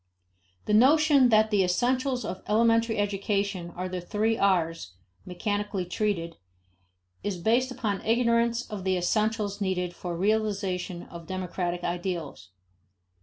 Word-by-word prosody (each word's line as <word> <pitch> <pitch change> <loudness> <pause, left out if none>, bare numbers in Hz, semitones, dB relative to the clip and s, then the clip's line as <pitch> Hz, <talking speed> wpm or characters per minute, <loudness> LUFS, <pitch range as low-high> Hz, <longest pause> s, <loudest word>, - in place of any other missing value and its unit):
The 210 - 0
notion 280 +3 +5
that 220 -1 +4
the 200 -2 +3
"essentials" 250 +7 0
of 185 - -5
elementary 230 +1 +3
education 200 -2 -1
are 185 +1 -3
the 180 -1 -4
three 215 +5 0
R's 165 - 0 0.3
mechanically 205 +1 -2
treated, 175 -3 -2 0.9
is 205 -3 -2
based 235 +8 +2
upon 225 -6 -3
ignorance 235 +1 +2
of 210 -4 -6
the 185 -1 +1
essentials 210 +2 0
needed 180 -2 -1
for 175 -1 -5
realization 195 -3 -1
of 170 -1 -11
democratic 180 -1 -3
ideals. 175 - -4
200 Hz, 120 wpm, -27 LUFS, 180-225 Hz, 0.9 s, notion